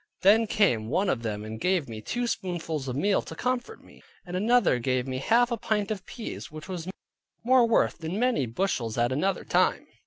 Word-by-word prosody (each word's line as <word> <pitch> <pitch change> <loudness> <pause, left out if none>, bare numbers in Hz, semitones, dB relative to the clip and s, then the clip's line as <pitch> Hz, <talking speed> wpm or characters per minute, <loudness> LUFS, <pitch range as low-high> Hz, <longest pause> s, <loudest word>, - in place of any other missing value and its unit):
Then 215 +4 +5
came 120 - +2
one 185 +7 +1
of 125 - 0
them 105 -2 -4
and 110 0 -7
gave 180 -5 +1
me 110 -2 -7
two 245 - -2
spoonfuls 170 - -3
of 125 - -3
meal 195 +8 +2
to - - -9
comfort 255 - -3
me, - - -18 0.2
and 180 0 -6
another 220 - +3
gave 130 0 0
me 130 -1 -3
half 235 - +3
a 235 - 0
pint 210 -1 -1
of 195 -3 -5
peas; 230 - -7
which 155 +2 -9
was 180 -3 -5 0.6
more 250 0 +5
worth 230 - +2
than 165 +4 -4
many 240 - +1
bushels 115 - -2
at 120 +1 +2
another 185 +9 0
time. - - +2
180 Hz, 205 wpm, -27 LUFS, -, 0.6 s, Then